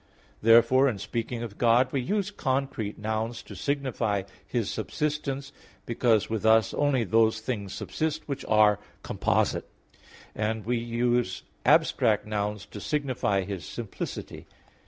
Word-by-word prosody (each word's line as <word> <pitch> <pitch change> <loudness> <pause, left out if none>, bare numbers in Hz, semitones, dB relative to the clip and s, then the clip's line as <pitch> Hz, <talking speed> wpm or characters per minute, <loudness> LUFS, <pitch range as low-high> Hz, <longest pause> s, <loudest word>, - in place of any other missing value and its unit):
Therefore 120 +4 +6
in 110 - -3
speaking 115 +4 -3
of 105 -3 -8
God, 120 +2 +4
we 135 - 0
use 200 +8 -1
concrete 130 - -2
nouns 110 +2 -3
to - - -10
signify 130 -8 -1 0.2
His 115 -5 -1
subsistence, 140 +2 -3 0.3
because 115 -2 +2
with 110 -2 -3
us 110 -1 +4
only 145 -4 +2
those 110 +1 +3
things 110 -4 -4
subsist 155 0 -2
which 140 -2 -4
are 105 -1 +5 0.2
composite; - - 0 0.6
and 110 0 -2
we 120 +1 +1
use 120 -3 0 0.2
abstract 105 -2 +4
nouns 105 -1 -2
to 105 - -7
signify 130 -9 0
His 95 -3 -5
simplicity. 110 +7 -6
115 Hz, 130 wpm, -27 LUFS, 105-130 Hz, 0.6 s, Therefore